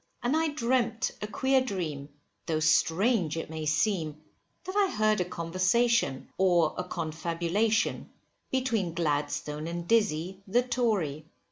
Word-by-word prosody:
And 245 +5 +1
I 320 0 +2
dreamt 250 -5 0
a 210 - -3
queer 265 +4 +2
dream, 165 - -4 0.4
though 160 -2 0
strange 165 +3 +2
it 165 - -5
may 155 -1 -4
seem, 155 -1 0 0.4
that 375 - -6
I 405 -2 +3
heard 215 -2 +2
a - - 0
conversation, 185 - +1
or 175 -4 +3
a 180 - -2
confabulation, 170 +7 -1 0.4
between 230 -10 0
Gladstone 150 -1 -1
and 170 0 -5
Dizzy, 190 -4 +1
the 240 +6 +3
Tory. 210 - -1
185 Hz, 130 wpm, -28 LUFS, 160-235 Hz, 0.4 s, I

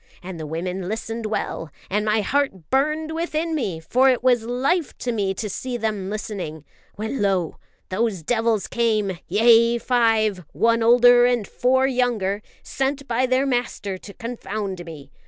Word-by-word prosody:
And 180 -2 -7
the 155 - -5
women 180 +4 -4
listened 225 +1 -4
well, 190 -6 -3 0.2
and 210 +2 0
my 215 0 +2
heart 210 - -1
burned 305 +4 +1
within 325 0 -2
me 210 - -2
for 255 +11 +3
it 250 -2 +1
was 245 -3 +3
life 275 +7 0
to 245 - -2
me 200 -4 -1
to 215 - -3
see 245 +5 -4
them 210 -4 -2
listening 185 -8 -5 0.3
when 220 +5 -3
lo! 190 -5 0 0.3
those 195 -3 -1
devils 225 +1 +1
came 215 -6 0
yea, 230 +4 +5
five, 225 -6 +2
one 230 0 +2
older 245 +1 +6
and 240 -5 0
four 260 +1 +2
younger 240 -6 0 0.2
sent 275 +1 -2
by 245 +2 +1
their 255 +2 +2
master 240 -7 -2
to 200 - -11
confound 210 -5 -5
me. 145 -4 -10
225 Hz, 155 wpm, -23 LUFS, 195-250 Hz, 0.3 s, older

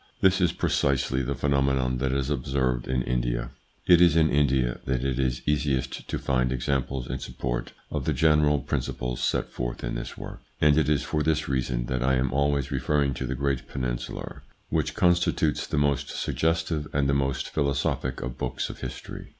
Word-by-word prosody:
This 95 0 +4
is 90 - +4
precisely 65 -1 +1
the 70 +2 -2
phenomenon 65 -2 +1
that 65 0 0
is 70 +1 -1
observed 65 -3 0
in 65 -1 0
India. - - -1 0.3
It 90 -1 +7
is 85 -2 +6
in 80 -1 +4
India 65 -4 +2
that 65 -1 0
it 65 -1 0
is 65 -2 0
easiest 70 -3 -1
to - - -1
find 65 -2 0
examples 65 0 -1
in 65 +1 -3
support - - -4 0.2
of - - -2
the - - +1
general 75 -2 +4
principles 60 0 -3
set - - 0
forth - - -4
in - - -2
this - - -5
work, - - -8 0.2
and 75 -1 +5
it 75 -1 +2
is 75 -2 +2
for 75 - -1
this 80 0 +1
reason 65 -2 -1
that 65 0 -2
I 65 +1 +3
am 65 -1 0
always 70 -1 +1
referring 70 +1 +1
to 65 +1 -4
the 65 - -2
great 70 0 -1
peninsular, 60 -2 -4 0.3
which - - 0
constitutes 85 -3 +2
the - - -2
most 70 -2 +1
suggestive 80 -2 -1
and 70 -1 +2
the 70 - +2
most 70 -1 0
philosophic 70 -2 -1
of 65 -1 -6
books - - -2
of - - -12
history. - - -7
65 Hz, 185 wpm, -26 LUFS, 65-75 Hz, 0.3 s, It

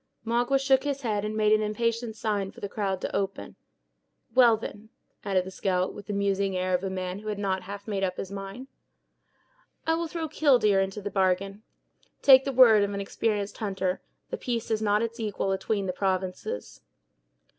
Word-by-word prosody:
Magua 240 +4 +2
shook 270 -1 +3
his 280 -1 -2
head, 210 -3 0
and 215 +1 -3
made 215 -1 +3
an 215 - +4
impatient 230 +1 -1
sign 205 -3 -1
for - - -13
the 200 - -4
crowd 195 -2 -2
to - - -3
open. 195 - -3 0.8
"Well, 240 -3 +6
then," 215 0 -8 0.3
added 190 -2 +1
the 190 - -7
scout, 185 -1 0
with 205 - -10
the 205 - -3
musing 200 -1 0
air 185 0 0
of 180 +1 +1
a 195 - -1
man 185 0 -4
who 215 - -10
had 210 -1 -2
not 190 -2 -1
half 200 +3 -8
made 200 -2 -2
up 185 -1 -1
his 195 - -5
mind; 195 +5 -7 1.2
"I 325 - +2
will 335 +1 -1
throw 325 0 -4
'killdeer' 245 -10 +4
into 195 +2 -3
the 205 - -4
bargain. 195 +1 0 0.6
Take 265 -1 +8
the 275 - 0
word 240 -5 +7
of 200 0 0
an - - -3
experienced 205 0 -2
hunter, 190 -3 -2 0.3
the - - -2
piece 235 -3 -3
has 220 -1 0
not 210 +1 +2
its 230 +1 -4
equal 205 -3 -1
atween 195 +1 -1
the 185 - -2
provinces." 185 - -3
205 Hz, 195 wpm, -27 LUFS, 195-230 Hz, 1.2 s, Take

